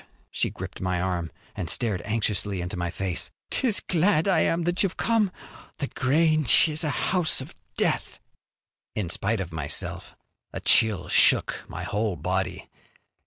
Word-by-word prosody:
She - - 0
gripped - - -8
my 90 -1 0
arm 90 -2 -2 0.2
and 85 - -4
stared 105 -5 -1
anxiously 105 -3 -1
into 90 0 -4
my 90 -1 -2
face. 90 0 -3 0.2
"'Tis 230 -7 +3
glad 175 0 +2
I 190 - +4
am 165 +1 +1
that 175 +2 0
you've 195 -3 0
come. 225 -4 +2 0.5
The 140 - -2
Grange 155 +2 +4
is 155 +2 +2
a 155 - 0
house 180 +2 +1
of - - -7 0.2
death." - - 0 0.8
In 100 -5 -2
spite 105 +5 0
of 90 -3 -5
myself 80 -3 -4 0.4
a - - -4
chill 105 -6 +4
shook - - +4
my - - -6
whole 105 -2 -1
body. 90 +4 -2
110 Hz, 155 wpm, -26 LUFS, -, 0.8 s, I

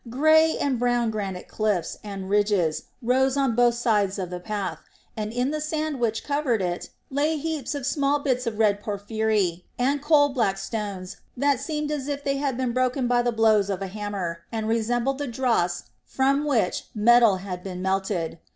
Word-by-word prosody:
Grey 315 +5 +4
and 265 -4 0
brown 240 -2 +1
granite 195 -4 -4
cliffs 210 -6 -1
and 195 -2 -6
ridges 200 -5 +1 0.2
rose 260 +3 +2
on 270 -4 +2
both 240 0 +3
sides 210 -5 +1
of 185 -2 -4
the 180 - -4
path, 200 0 -4 0.4
and 215 -1 -3
in 250 +4 0
the 305 0 -2
sand 310 -2 -2
which 225 -2 0
covered 285 -6 0
it 175 -2 -3 0.2
lay 300 +3 +1
heaps 305 -2 -3
of 280 -3 -4
small 280 0 +1
bits 255 -4 -1
of 220 -2 -2
red 205 -2 +2
porphyry 205 -3 -1
and 275 +3 +1
coal 295 -1 +4
black 225 -8 0
stones 195 -2 -5 0.2
that 280 0 +2
seemed 300 -2 -3
as 290 -2 -3
if 285 -1 -3
they 275 -1 0
had 275 -3 -1
been 255 -2 0
broken 255 +1 0
by 245 0 +3
the 240 0 +1
blows 220 -3 +3
of 195 - -1
a 190 -1 -6
hammer 200 -5 -4
and 220 -2 -2
resembled 240 +4 0
the 290 - -2
dross 230 -8 0 0.2
from 275 +2 +1
which 235 -11 0
metal 230 -1 +6
had 185 -1 -6
been 185 -2 -6
melted. 190 -3 -1
235 Hz, 185 wpm, -25 LUFS, 200-275 Hz, 0.4 s, metal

